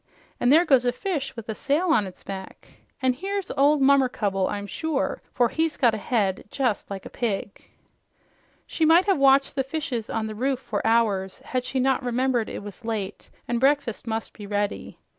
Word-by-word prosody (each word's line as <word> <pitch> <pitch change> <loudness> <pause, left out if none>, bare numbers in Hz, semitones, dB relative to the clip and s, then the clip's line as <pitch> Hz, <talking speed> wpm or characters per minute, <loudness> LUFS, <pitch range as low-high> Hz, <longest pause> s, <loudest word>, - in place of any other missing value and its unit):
And 245 - +3
there 325 +4 +6
goes 265 -6 +4
a 245 - +2
fish 315 -5 -3
with 230 -2 -8
a 220 - -2
sail 295 +10 0
on 215 -11 +3
its 185 - -13
back, 190 -1 -8 0.4
an' 260 -1 +3
here's 390 +6 -4
old 285 +1 +3
Mummercubble, 250 -9 +2
I'm 205 0 -4
sure, 310 - -2
for 240 -2 +2
he's 320 -1 -1
got 240 -4 +4
a 220 - -3
head 200 -3 0
just 250 -5 -1
like 195 -1 -6
a - - -7
pig." 205 -4 -4 1.0
She 325 - -2
might 330 +4 +6
have 390 -7 +2
watched 275 +1 +4
the 270 - +1
fishes 270 -5 -4
on 225 -1 -2
the 215 - -4
roof 260 +5 0
for 215 -5 -3
hours, 210 -5 +1
had 255 -1 -2
she 260 +1 -2
not 265 +1 +2
remembered 245 -1 0
it - - -6
was 205 +3 -10
late 220 -4 -4 0.2
and 240 -1 0
breakfast 270 -4 +1
must 225 0 -3
be 205 -2 -10
ready. 205 0 -2
245 Hz, 195 wpm, -25 LUFS, 215-280 Hz, 1.0 s, there